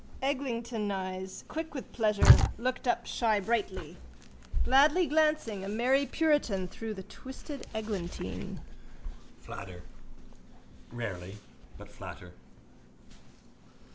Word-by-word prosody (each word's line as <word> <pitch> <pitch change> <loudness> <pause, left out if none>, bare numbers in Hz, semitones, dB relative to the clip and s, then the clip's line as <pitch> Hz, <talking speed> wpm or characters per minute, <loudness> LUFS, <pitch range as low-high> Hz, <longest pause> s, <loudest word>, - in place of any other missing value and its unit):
Eglintoneyes, 220 -8 -2
quick 320 -1 -5
with 270 - -6
pleasure, 215 -3 +1 0.3
looked 250 +2 -2
up - - +1
shybrightly. 205 -6 0 0.7
Gladly 295 +7 +5
glancing, 305 -9 +2
a 195 - -4
merry 255 +6 +2
puritan, 290 - +2
through 220 +4 -6
the 190 - -7
twisted 265 - -9
eglantine. 175 - -4 0.8
Flatter. 90 -2 -8 1.1
Rarely. 100 -5 -5 0.4
But - - -11
flatter. - - -9
220 Hz, 85 wpm, -31 LUFS, 190-270 Hz, 1.1 s, Gladly